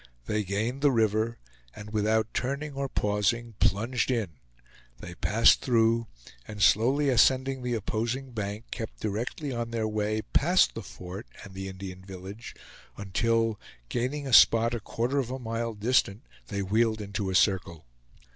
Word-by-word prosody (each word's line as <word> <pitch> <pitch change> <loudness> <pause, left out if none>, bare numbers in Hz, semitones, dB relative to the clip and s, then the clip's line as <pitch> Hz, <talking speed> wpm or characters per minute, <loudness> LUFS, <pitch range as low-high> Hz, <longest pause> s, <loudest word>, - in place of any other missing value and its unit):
They 105 0 -1
gained 110 +7 -2
the 145 - +5
river, 110 0 +1 0.4
and 105 +1 -10
without 110 +1 +1
turning 140 +3 -2
or 135 0 -3
pausing 105 +2 0
plunged 115 +6 +1
in; 115 -7 0 0.7
they 90 - -9
passed 110 +6 +4
through, 115 -2 +2 0.4
and 105 - -8
slowly 125 +9 +4
ascending 130 +2 +3
the 125 -1 -1
opposing 115 +5 -3
bank, 105 0 -4
kept 110 - -6
directly 115 +7 -3
on 120 -1 -3
their 115 -2 -1
way 110 0 -1
past 175 +6 +4
the 115 - -6
fort 95 +2 -9 0.2
and 100 - -11
the 95 0 -6
Indian 95 -1 -8
village, 95 +4 -9 0.4
until, 115 +2 0 0.3
gaining 135 +4 -2
a 135 - -4
spot 115 +1 +6
a 120 - -2
quarter 120 +6 -1
of 125 -3 -2
a 130 - -3
mile 115 -2 -3
distant, 110 0 +1 0.2
they 100 -1 -3
wheeled 110 +3 +1
into 100 -1 -3
a 95 - -2
circle. 90 - +1
110 Hz, 155 wpm, -28 LUFS, 105-120 Hz, 0.7 s, spot